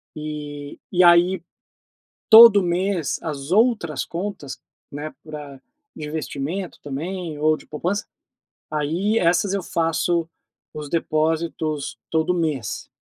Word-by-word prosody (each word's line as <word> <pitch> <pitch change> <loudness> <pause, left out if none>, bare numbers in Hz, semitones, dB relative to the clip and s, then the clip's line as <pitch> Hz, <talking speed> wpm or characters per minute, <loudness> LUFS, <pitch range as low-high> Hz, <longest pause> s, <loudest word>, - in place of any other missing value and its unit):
e 150 -1 -7
e 180 -1 +4
aí, 175 +1 +5 0.9
todo 220 -2 +10
mês, 180 -2 -1
as 145 0 -5
outras 210 - +2
contas, 175 -5 -6 0.3
né, 150 +2 -6
pra 150 -3 -9 0.4
de 150 -1 -6
investimento 160 +4 -4
também 160 +3 -5
ou 155 +1 +3
de - - -16
poupança, 180 +7 -3 0.6
aí 165 +9 0
essas 180 +2 +2
eu 200 - -1
faço 165 0 0 0.5
os 150 -1 -6
depósitos 155 -1 -1
todo 160 +2 +1
mês. 155 -9 -3
165 Hz, 110 wpm, -22 LUFS, 150-180 Hz, 0.9 s, todo